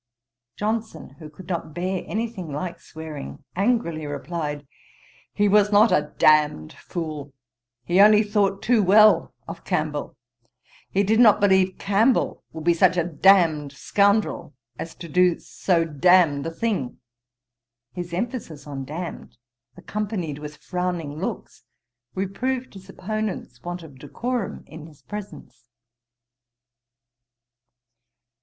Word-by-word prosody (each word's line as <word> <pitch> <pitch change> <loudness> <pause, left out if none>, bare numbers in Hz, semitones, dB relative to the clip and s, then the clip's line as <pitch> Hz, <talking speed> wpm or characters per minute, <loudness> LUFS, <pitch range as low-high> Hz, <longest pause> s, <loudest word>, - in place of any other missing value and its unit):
Johnson, 215 -6 -3
who 155 -2 -9
could 165 +4 -14
not 165 -4 -4
bear 185 +1 -2
any 225 +2 -1
thing 190 -9 -7
like 170 +5 -5
swearing, 155 -3 -9
angrily 190 -7 0
replied, 145 0 -4 0.7
'He 205 - +1
was 205 +1 +4
not 210 +3 +5
a 150 0 +1
damned 150 - +3
fool: 155 -5 -6 0.5
he 180 +6 +4
only 210 +1 +7
thought 205 -2 0
too 235 -2 +3
well 210 +3 +5
of - - -8
Campbell. - - -2 0.7
He 200 - +1
did 220 +3 +2
not 215 -4 +7
believe 190 -2 +3
Campbell 215 +6 +1
would 160 -1 -8
be 170 +1 +4
such 180 +1 +3
a 170 - +3
damned 160 -3 +3
scoundrel, 200 -2 +1 0.2
as 165 - -6
to 170 - -9
do 180 +1 +3
so 170 -3 0
damned 165 -1 +3
a - - -1
thing.' 175 - -2 1.0
His 175 -1 -6
emphasis 180 - -4
on 140 -2 -6
damned, 165 0 -7 0.4
accompanied 185 -6 -4
with 150 0 -8
frowning 175 -5 -4
looks, - - -5 0.5
reproved 245 +7 -3
his 190 -1 -13
opponent's 200 - -5
want 175 0 -6
of 140 -5 -14
decorum 235 - -4
in 155 0 -11
his 150 -3 -19
presence. 205 -8 -9
180 Hz, 125 wpm, -23 LUFS, 155-205 Hz, 1.0 s, only